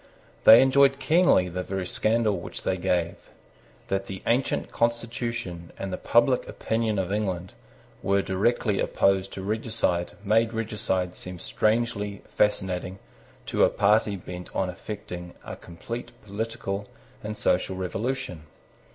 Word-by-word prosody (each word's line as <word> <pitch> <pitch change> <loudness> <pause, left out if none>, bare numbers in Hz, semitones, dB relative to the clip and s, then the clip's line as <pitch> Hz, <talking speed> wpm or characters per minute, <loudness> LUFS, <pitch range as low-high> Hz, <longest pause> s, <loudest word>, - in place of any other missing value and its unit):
They 115 +3 +10
enjoyed 135 +1 +5
keenly 155 - +4
the 90 +1 -3
very 95 0 -3
scandal 110 +2 +2
which - - -7
they 95 - +1
gave. 90 -2 -1 0.6
That 95 0 -1
the 95 -1 -7
ancient 125 +3 0
constitution 115 -7 -2
and 95 -1 -4
the - - -2
public 125 +2 +3
opinion 110 -2 -1
of 95 0 -1
England 95 -4 -2 0.5
were 100 0 +2
directly 100 +2 +1
opposed 95 0 +2
to 95 - -6
regicide 105 -4 -1
made 110 +2 +3
regicide 105 -5 -1
seem 90 0 -7
strangely 105 0 -1
fascinating 95 -3 0 0.5
to - - +2
a - - +6
party 105 0 +3
bent 90 -1 -8
on 95 -1 0
effecting 90 -2 -8
a - - -6
complete 115 +10 -8
political 105 -1 -4 0.4
and 105 0 -5
social 95 +1 +1
revolution. 95 - -3
100 Hz, 130 wpm, -26 LUFS, 90-115 Hz, 0.6 s, They